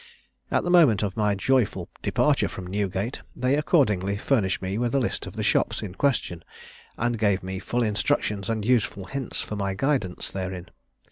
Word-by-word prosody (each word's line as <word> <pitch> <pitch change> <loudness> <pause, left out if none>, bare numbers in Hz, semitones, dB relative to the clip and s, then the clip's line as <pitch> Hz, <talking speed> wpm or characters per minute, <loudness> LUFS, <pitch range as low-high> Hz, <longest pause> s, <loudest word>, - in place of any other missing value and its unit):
At - - +1
the 175 - 0
moment 145 - +6
of 100 -3 -2
my 105 -2 +2
joyful 105 -5 +1
departure - - +2
from 95 - -7
Newgate, 100 +4 -2
they 125 +2 +1
accordingly 105 - +2
furnished 105 -4 +1
me 95 +3 -3
with 120 +1 0
a - - +4
list 125 - -2
of - - -9
the - - -2
shops - - +1
in 95 -4 -6
question, 95 - 0 0.5
and 120 -1 0
gave 100 -4 +2
me 95 0 -4
full 120 +5 -1
instructions 105 -2 0
and 110 -2 -1
useful 110 -5 +1
hints 135 +6 -4
for 105 - -5
my 100 -1 -2
guidance 125 -6 -1
therein. 95 -2 -5
105 Hz, 180 wpm, -25 LUFS, 95-125 Hz, 0.5 s, moment